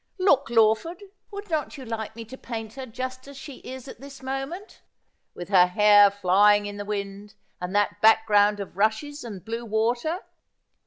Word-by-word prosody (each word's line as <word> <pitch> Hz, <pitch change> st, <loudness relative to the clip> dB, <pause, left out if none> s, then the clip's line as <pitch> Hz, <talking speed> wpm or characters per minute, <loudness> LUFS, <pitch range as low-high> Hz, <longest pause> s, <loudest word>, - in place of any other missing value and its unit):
Look, 370 Hz, -10 st, +2 dB
Lawford, 230 Hz, -, +2 dB, 0.3 s
would 405 Hz, 0 st, -8 dB
not 305 Hz, -1 st, -2 dB
you 265 Hz, -, -9 dB
like 220 Hz, -1 st, -5 dB
me 230 Hz, 0 st, -8 dB
to 255 Hz, -, -10 dB
paint 225 Hz, -4 st, -7 dB
her 265 Hz, 0 st, -8 dB
just 255 Hz, +2 st, -6 dB
as 280 Hz, -1 st, -11 dB
she 275 Hz, -1 st, -10 dB
is 260 Hz, 0 st, -10 dB
at 260 Hz, -, -11 dB
this 275 Hz, -1 st, -12 dB
moment, 270 Hz, +9 st, -6 dB, 0.5 s
with 175 Hz, 0 st, -8 dB
her 180 Hz, -3 st, +6 dB
hair 205 Hz, +2 st, +6 dB
flying 205 Hz, +1 st, +3 dB
in 205 Hz, 0 st, -6 dB
the 205 Hz, -, -6 dB
wind, 205 Hz, 0 st, -6 dB, 0.3 s
and 180 Hz, +2 st, -4 dB
that 205 Hz, 0 st, 0 dB
background 210 Hz, -2 st, +4 dB
of 195 Hz, -3 st, -7 dB
rushes 220 Hz, +8 st, -1 dB
and 205 Hz, -6 st, -9 dB
blue 230 Hz, +1 st, -4 dB
water 240 Hz, -, -1 dB
225 Hz, 175 wpm, -25 LUFS, 205-270 Hz, 0.5 s, her